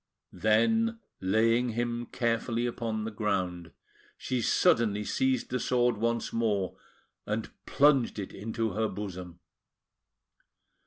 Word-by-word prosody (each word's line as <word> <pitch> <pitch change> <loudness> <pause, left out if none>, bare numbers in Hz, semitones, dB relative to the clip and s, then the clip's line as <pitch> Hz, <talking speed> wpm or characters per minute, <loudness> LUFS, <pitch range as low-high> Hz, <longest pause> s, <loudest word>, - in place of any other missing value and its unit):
Then, 225 - +2 0.2
laying 115 +5 +2
him 120 0 -2
carefully 115 0 -1
upon 115 -2 -2
the 110 - -4
ground, 95 -5 -2 0.5
she 125 -2 -2
suddenly 115 - +3
seized 130 +3 0
the 125 - 0
sword 125 -2 +2
once 115 +2 -1
more, 105 -5 0 0.5
and 105 +1 -2 0.2
plunged 140 -5 +3
it 100 -2 -5
into 110 +1 -2
her 110 +3 0
bosom. 90 -5 -7
115 Hz, 110 wpm, -29 LUFS, 105-120 Hz, 0.5 s, suddenly